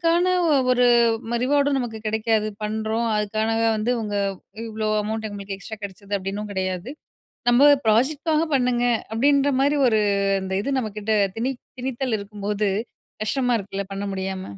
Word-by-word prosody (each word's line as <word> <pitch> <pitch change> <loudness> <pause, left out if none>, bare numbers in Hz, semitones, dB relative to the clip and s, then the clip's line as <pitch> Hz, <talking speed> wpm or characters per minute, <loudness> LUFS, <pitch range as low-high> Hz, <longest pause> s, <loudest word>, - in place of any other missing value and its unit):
அதற்கான 350 +2 +3 0.4
ஒரு 250 0 +4 0.6
ரிவார்டும் 285 0 +2
நமக்கு 230 -3 -4
கிடைக்காது, 220 0 +1 0.2
பண்றோம் 220 +2 -1
அதுக்காக 215 +2 0 0.2
வந்து 215 +3 -1
இவங்க 210 -2 -3 0.6
இவ்ளோ 215 0 -2
அமௌன்ட் 220 +1 -3
இவங்களுக்கு 200 -1 -6
எக்ஸ்ட்ரா 220 +1 -8
கெடச்சது 200 +1 -4
அப்டின்னும் 200 +2 -5
கெடையாது. 185 +4 -3 0.6
நம்ம 280 +4 +7 0.2
பிராஜெக்ட்க்காக 300 +8 +2
பண்ணுங்க 250 -1 +1 0.3
அப்டின்ற 280 +4 +3
மாரி 285 +2 +2
ஒரு 220 -2 +3 0.4
இந்த 190 0 -4
இது 280 - -2
நம்மகிட்ட 215 -1 -2 0.2
திணி 255 +4 0 0.3
திணித்தல் 255 -2 -2
இருக்கும்போது 205 0 -2 0.5
கஷ்டமா 245 +2 +1
இருக்குல 200 0 -5
பண்ண 195 - -4
முடியாம. 190 0 -4
220 Hz, 130 wpm, -23 LUFS, 205-255 Hz, 0.6 s, நம்ம